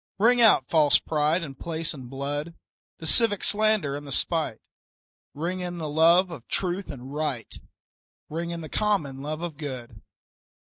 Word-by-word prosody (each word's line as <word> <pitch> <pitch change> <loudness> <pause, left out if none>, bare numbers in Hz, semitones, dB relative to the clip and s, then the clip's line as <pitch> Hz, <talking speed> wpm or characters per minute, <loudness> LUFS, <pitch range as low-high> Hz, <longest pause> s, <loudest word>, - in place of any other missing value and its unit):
Ring 240 +4 +4
out 225 -2 +6
false 155 -3 +5
pride 155 +3 0
in 140 -4 -6
place 165 +4 -3
and 130 -4 -10
blood, 145 +4 -4 0.4
The 160 - -9
civic 205 +3 +4
slander 215 -9 +2
and 145 0 -7
the - - -7
spite; - - 0 0.8
Ring 175 +5 -3
in 175 -1 -4
the 160 -2 -4
love 170 +4 +4
of 135 -8 -9
truth 185 +1 -2
and 135 -1 -8
right, 145 -6 -3 0.7
Ring 170 +2 -4
in 170 -1 -5
the 160 - -7
common 155 -10 -1
love 155 +3 -4
of 165 -4 -5
good. 130 -6 -7
160 Hz, 160 wpm, -26 LUFS, 145-180 Hz, 0.8 s, out